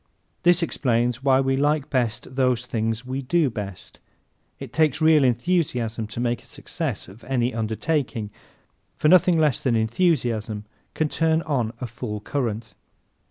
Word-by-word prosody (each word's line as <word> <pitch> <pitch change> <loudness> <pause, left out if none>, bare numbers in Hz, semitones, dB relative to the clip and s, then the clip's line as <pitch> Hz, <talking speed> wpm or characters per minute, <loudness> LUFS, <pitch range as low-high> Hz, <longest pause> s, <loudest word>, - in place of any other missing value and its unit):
This 175 0 +4
explains 125 -5 0
why 135 -1 +4
we 135 0 +1
like 145 +1 +1
best 125 -1 -1
those 125 -2 +1
things 115 0 -2
we 130 +2 -3
do 150 +1 +1
best. 100 -4 -7 0.6
It - - -8
takes 155 -3 +2
real 155 -2 +5
enthusiasm 120 -4 0
to 110 - -7
make 120 -1 -1
a - - -21
success - - -5
of 100 +6 -14
any 125 -2 0
undertaking 115 0 -2 0.6
for 150 - +2
nothing 180 -1 +6
less 150 -4 +2
than 125 -4 +1
enthusiasm 110 - 0 0.3
can 155 - +1
turn 160 +1 +1
on 125 -8 -1
a 125 - -3
full 115 -2 -5
current. 115 -2 -3
125 Hz, 150 wpm, -24 LUFS, 115-150 Hz, 0.6 s, nothing